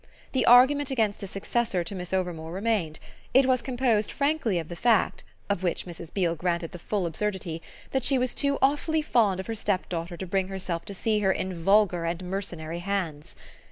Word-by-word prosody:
The 255 -4 +1
argument 260 +4 +6
against 220 -6 0
a 200 - -4
successor 195 -1 -1
to 170 - -5
Miss 180 -2 -5
Overmore 175 -4 -2
remained: 190 -5 -1 0.4
it 265 0 +7
was 255 -1 +2
composed 240 -4 +1
frankly 280 - 0
of 165 -2 -3
the 175 - -7
fact, 225 +2 +2 0.2
of 200 -3 -1
which 180 -2 -1
Mrs. 170 -2 -9
Beale 175 -4 +1
granted 170 0 -2
the 175 - -9
full 195 +1 -1
absurdity, 170 -1 -3 0.3
that 265 -2 0
she 270 +1 +4
was 250 -1 0
too 280 -1 +1
awfully 300 +3 +2
fond 215 -10 +2
of 190 - -4
her 225 - -3
stepdaughter 180 -5 -2
to 190 - -5
bring 190 +1 0
herself 180 -3 -4
to 200 - -6
see 215 +2 +1
her 195 -2 +3
in 185 -3 -3
vulgar 195 -3 +3
and 170 +2 -2
mercenary 175 -3 -4
hands. 175 -6 -3
195 Hz, 195 wpm, -27 LUFS, 175-230 Hz, 0.4 s, it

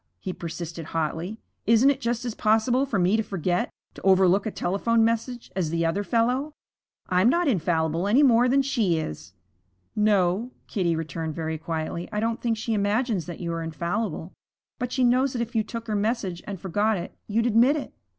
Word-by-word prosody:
he 185 - -4
persisted 165 -1 -6
hotly. 165 +6 -2 0.3
'Isn't 230 +5 +6
it 275 -1 -4
just 240 +1 -1
as 240 - -2
possible 225 +6 +2
for 225 - -1
me 185 +3 +3
to - - +2
forget, 180 -4 -1 0.2
to - - -12
overlook 190 +1 +4
a - - +1
telephone 225 +4 +1
message, 230 +2 -2
as 180 -5 0
the 165 +1 0
other 190 +5 0
fellow? 250 +7 0 0.5
I'm 185 +5 +4
not 345 +4 +2
infallible 165 - +1
any 250 +8 +5
more 245 -2 +5
than 275 +2 +3
she 225 -11 +1
is.' 95 - -6 0.6
'No,' 210 +1 +2 0.2
Kitty 175 -6 0
returned 160 0 -4
very 160 -1 -3
quietly. 165 +1 -4
'I 210 - -1
don't 225 +1 -1
think 230 -2 0
she 225 +1 -2
imagines 205 -2 0
that 175 - -7
you 170 -1 -2
are 165 - -3
infallible. 170 +3 -3 0.5
But 250 -1 -3
she 260 - +1
knows 255 +2 +3
that 240 - -2
if 235 +1 -10
you 220 - +4
took 230 +1 -6
her 215 -2 -2
message 205 -4 -1
and 200 -3 -5
forgot 205 +4 +1
it, 175 - -7
you'd 225 +2 +1
admit 240 +5 +4
it.' 300 - -5
210 Hz, 190 wpm, -25 LUFS, 175-235 Hz, 0.6 s, Isn't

